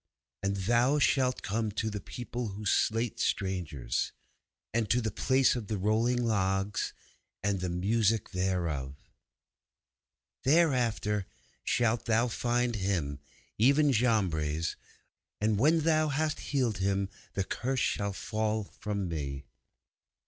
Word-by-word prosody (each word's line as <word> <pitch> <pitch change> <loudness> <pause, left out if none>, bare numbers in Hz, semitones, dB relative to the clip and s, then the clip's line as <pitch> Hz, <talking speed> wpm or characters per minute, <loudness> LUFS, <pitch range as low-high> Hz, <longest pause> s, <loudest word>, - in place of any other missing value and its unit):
And 100 0 0
thou 120 +8 +3
shalt 130 -3 +2
come 110 +2 -1
to 110 +1 -1
the 105 - -4
people 120 -1 -5
who 105 +1 -7
slate 115 +3 +1
strangers, 80 - -1 0.6
and 115 -2 0
to 125 - +3
the 110 -2 -1
place 130 +6 +3
of 115 -5 -4
the 105 - -2
Rolling 110 +5 +2
of - - 0
Logs, 100 -1 0 0.5
and 100 -1 +1
the 90 0 -2
music 105 +4 +1
thereof. 85 -8 -1 1.5
'Thereafter 125 - +2 0.4
shalt 120 -1 +1
thou 115 +2 +3
find 120 0 0
Him, 90 -8 -1 0.4
even 140 +5 +5
Jambres. 85 - +1 0.6
And 105 -1 +1
when 160 +6 +4
thou 155 0 +3
hast 155 +2 0
healed 125 -8 +1
him 100 0 +1 0.3
the 95 - 0
Curse 130 +6 -2
shall 100 -1 0
fall 110 +1 -1
from 100 -1 -4
me! 70 -4 -4
110 Hz, 125 wpm, -30 LUFS, 95-120 Hz, 1.5 s, even